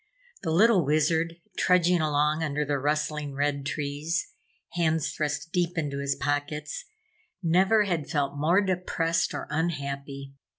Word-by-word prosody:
The 165 - -3
little 190 +3 +5
Wizard, 160 +3 +1 0.2
trudging 180 -1 +4
along 150 +1 +1
under 150 -1 -1
the 145 -1 0
rustling 150 0 -1
red 140 0 -1
trees, 150 +5 -2 0.4
hands 160 -3 0
thrust 150 +1 -3
deep 175 -1 0
into 145 -3 -2
his 140 0 0
pockets, 145 - -2 0.6
never 190 +6 +4
had 170 -7 -2
felt 145 -1 0
more 165 +7 +3
depressed 175 -3 0
or - - -4
unhappy. 140 -3 -3
155 Hz, 130 wpm, -27 LUFS, 145-170 Hz, 0.6 s, little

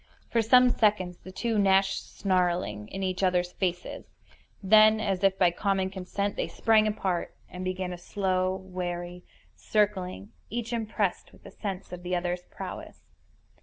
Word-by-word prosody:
For 230 - +3
some 250 +3 +6
seconds 185 -6 +1
the 185 - -11
two 225 +2 -1
gnashed 195 -1 +2
snarling 180 - 0
in 195 - -5
each 185 0 -2
other's 180 -1 +1
faces; 180 -2 -3 0.6
then, 215 +2 +6
as 195 -3 -1
if 195 -1 +3
by 180 -2 +4
common 190 +1 0
consent, 200 +2 -3
they - - -2
sprang 220 -1 +3
apart, 190 -4 -2
and 180 0 -7
began 185 0 -3
a 175 - -8
slow, 185 0 0
wary 180 -1 -5 0.3
circling, 205 -2 -1 0.2
each 235 +1 -4
impressed 215 -4 -2
with - - -20
a - - -10
sense 195 -4 -6
of 180 -1 -7
the 180 0 -2
other's 175 0 -2
prowess. - - -8
190 Hz, 155 wpm, -28 LUFS, 180-210 Hz, 0.6 s, some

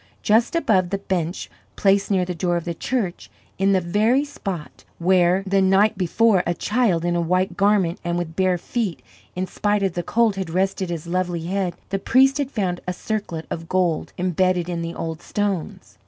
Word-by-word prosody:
Just 230 +7 +3
above 190 - +2
the 200 - -1
bench 180 -3 -3 0.3
placed 195 0 +2
near 190 -3 +2
the 180 - -3
door 175 0 0
of 170 - -5
the 170 - -2
church, 205 -2 -3 0.3
in 195 +1 +3
the 190 - +4
very 215 +10 +2
spot 195 - -6
where, 180 +1 +3
the 195 0 +2
night 195 +3 +4
before, 195 +2 +3
a 175 - 0
child 205 -7 +1
in 175 0 +1
a 170 - +1
white 180 +2 0
garment 200 -4 +2
and 175 0 -1
with 165 -2 -4
bare 185 -1 +2
feet, 210 -1 -3 0.3
in 185 +1 -1
spite 205 +2 0
of 190 -3 0
the 175 - -2
cold, 220 +2 +1
had 190 -3 -3
rested 190 +1 -1
his 170 -2 -4
lovely 175 -1 -2
head, 185 -1 -1
the 195 - -1
priest 270 +7 +4
had 280 -2 -1
found 190 -8 -2
a 180 - -1
circlet 180 -5 -4
of 165 0 -5
gold 180 -4 0
imbedded 180 0 +1
in 175 -1 -3
the 170 0 -5
old 160 -1 -5
stones. 195 - -3
185 Hz, 195 wpm, -22 LUFS, 175-200 Hz, 0.3 s, the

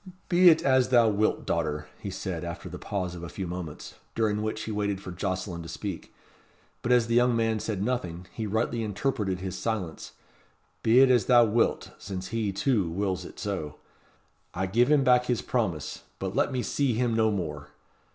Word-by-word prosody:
"Be 180 0 +7
it 160 - +4
as 130 -2 +3
thou 120 -3 +5
wilt, 105 +1 +1
daughter," 75 0 -1
he - - -5
said, - - -4
after - - -6
the - - -7
pause 90 -3 -3
of 85 - -8
a 85 - -6
few 95 - -5
moments, 85 -3 -6 0.2
during 105 -2 +1
which 110 0 -3
he 110 - -4
waited 100 -2 -1
for 95 - -8
Jocelyn 95 -1 -3
to 80 - -9
speak; - - -6 0.7
but, 120 - -1
as 120 -2 +5
the 115 - -2
young 120 0 +4
man 115 -1 +1
said 105 -3 -2
nothing, 90 -8 -2
he 110 -2 -3
rightly 115 +3 0
interpreted 105 -3 -1
his 95 0 -4
silence, 105 -8 -3 0.7
"be 115 +4 +5
it 135 -1 +6
as 120 -6 +4
thou 120 -2 +7
wilt, 115 +2 +1
since 95 -1 -6
he, 110 -3 -1
too, 100 -2 +1
wills 95 0 -2
it - - -11
so. 95 -8 -4 0.8
I 95 +2 0
give 120 +7 +2
him 150 -2 +5
back 125 -1 +4
his 125 -2 0
promise. 95 - -2 0.2
But 95 0 -4
let - - +2
me 125 -2 -1
see 140 -5 0
him 120 0 +1
no 110 -1 +3
more." 75 -8 -4
105 Hz, 195 wpm, -27 LUFS, 95-120 Hz, 0.8 s, Be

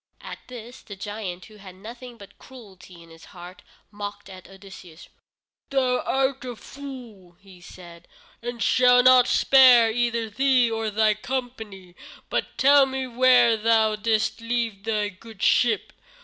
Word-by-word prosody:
At - - -10
this 245 0 -11
the 205 - -11
giant, 195 -2 -7
who 215 -1 -17
had 190 -2 -14
nothing 235 +5 -12
but 200 -3 -16
cruelty 190 -8 -15
in 165 - -19
his 165 0 -16
heart, 175 +1 -12 0.3
mocked 205 -1 -9
at 185 -1 -14
Odysseus. 190 -4 -15 0.6
"Thou 255 -2 0
art 270 0 -2
a 250 -2 -7
fool," 235 -10 -12 0.2
said 175 -1 -15 0.3
he, 235 - -10
"and 240 0 -5
I - - -12
shall 250 0 +4
not 255 -1 +5
spare 250 -4 +5
either 235 -1 -2
thee 250 +1 +1
or 225 -1 -3
thy 215 0 +1
company. 215 -6 -7 0.4
But - - -3
tell 280 0 +5
me 265 0 -4
where 245 -1 +3
thou 220 0 +1
didst 220 +1 -2
leave 230 -3 -4
thy 210 -2 -1
good 215 +2 -13
ship? 225 -5 +1
225 Hz, 150 wpm, -23 LUFS, 200-250 Hz, 0.6 s, not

